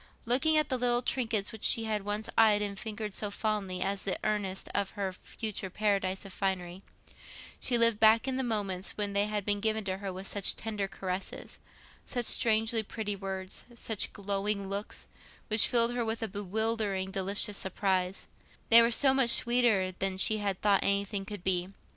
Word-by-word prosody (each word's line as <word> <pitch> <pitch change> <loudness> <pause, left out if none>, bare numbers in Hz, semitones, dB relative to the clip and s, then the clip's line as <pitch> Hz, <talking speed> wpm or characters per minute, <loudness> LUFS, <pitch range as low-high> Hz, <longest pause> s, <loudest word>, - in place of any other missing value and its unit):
Looking 275 +7 +2
at 305 -2 +2
the 255 - -1
little 245 0 +1
trinkets 225 -6 0
which 220 - -11
she 225 - +5
had 215 -2 -2
once 205 +1 -3
eyed 215 -2 +5
and 200 -1 -4
fingered 215 -2 -5
so 210 - -3
fondly 200 -4 -2
as 195 +1 -2
the 195 - -1
earnest 195 -3 -2
of 200 -1 0
her 195 -2 -2
future 205 0 -6
paradise 195 -1 -1
of 195 - -9
finery, 185 -2 -3 0.8
she 245 - +1
lived 230 -2 +3
back 220 +3 +5
in 260 - -1
the 265 - -1
moments 200 -5 -3
when 205 -1 -2
they 200 +1 +1
had 210 -2 -3
been 205 -1 +1
given 220 +1 0
to 190 -1 -3
her 195 -1 -5
with 185 +1 -8
such 200 -1 +1
tender 210 -3 -3
caresses, 190 -1 -6 0.5
such 245 -2 -2
strangely 225 0 +2
pretty 210 -1 -4
words, 190 -1 -5
such 220 -3 +1
glowing 200 0 -2
looks, 200 +1 -5 0.4
which 215 0 +4
filled 235 0 +3
her 245 -1 -1
with 225 0 -3
a - - -1
bewildering 205 -1 -2
delicious 200 +2 -1
surprise—they 190 +4 +1
were 230 - +3
so 265 +3 +5
much 265 -3 +3
sweeter 235 -7 +4
than 190 -1 -1
she 215 +3 +3
had 200 -2 -2
thought 205 -2 +3
anything 200 0 0
could 205 -2 -8
be. 180 -1 0
205 Hz, 180 wpm, -30 LUFS, 195-225 Hz, 0.8 s, she